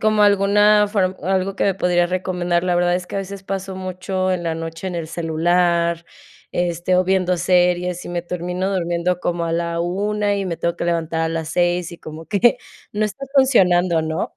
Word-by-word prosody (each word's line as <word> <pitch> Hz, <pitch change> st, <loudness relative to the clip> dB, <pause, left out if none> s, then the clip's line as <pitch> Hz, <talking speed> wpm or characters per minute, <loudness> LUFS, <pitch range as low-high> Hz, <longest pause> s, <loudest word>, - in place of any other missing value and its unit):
como 215 Hz, -1 st, +3 dB
alguna 205 Hz, +1 st, +4 dB
form 190 Hz, -3 st, 0 dB
algo 190 Hz, +2 st, 0 dB
que -, -, -1 dB
me 195 Hz, -, +2 dB
pudieras 175 Hz, -1 st, +1 dB
recomendar. 180 Hz, -1 st, -1 dB
La 180 Hz, -1 st, +1 dB
verdad 175 Hz, 0 st, +2 dB
es 180 Hz, 0 st, -6 dB
que -, -, -9 dB
a -, -, 0 dB
veces 195 Hz, 0 st, -6 dB
paso 190 Hz, 0 st, -4 dB
mucho 185 Hz, 0 st, -2 dB
en 180 Hz, -1 st, -2 dB
la 165 Hz, -1 st, -2 dB
noche 165 Hz, +3 st, -5 dB
en 180 Hz, -, -5 dB
el 165 Hz, -2 st, -4 dB
celular, 170 Hz, +1 st, +1 dB, 0.5 s
este, 175 Hz, +1 st, 0 dB
o 185 Hz, -, +3 dB
viendo 185 Hz, -1 st, +1 dB
series 180 Hz, 0 st, +1 dB
y -, -, -7 dB
me 175 Hz, 0 st, -3 dB
termino 180 Hz, +2 st, -3 dB
durmiendo 175 Hz, 0 st, -1 dB
como 170 Hz, -1 st, -1 dB
a 165 Hz, -, -2 dB
la 170 Hz, 0 st, -1 dB
1 205 Hz, +4 st, 0 dB
y 200 Hz, -1 st, -2 dB
me 170 Hz, -3 st, -3 dB
tengo 170 Hz, +1 st, -1 dB
que -, -, -3 dB
levantar 165 Hz, -1 st, -1 dB
a 165 Hz, -, +1 dB
las 165 Hz, -1 st, -3 dB
6 175 Hz, 0 st, 0 dB
y 170 Hz, -, -10 dB
como 155 Hz, +1 st, -9 dB
que 220 Hz, +4 st, +3 dB, 0.3 s
no 210 Hz, +1 st, 0 dB
está 275 Hz, +6 st, -5 dB
funcionando, 180 Hz, -, +4 dB
¿no? 160 Hz, 0 st, -3 dB
180 Hz, 205 wpm, -20 LUFS, 170-190 Hz, 0.5 s, alguna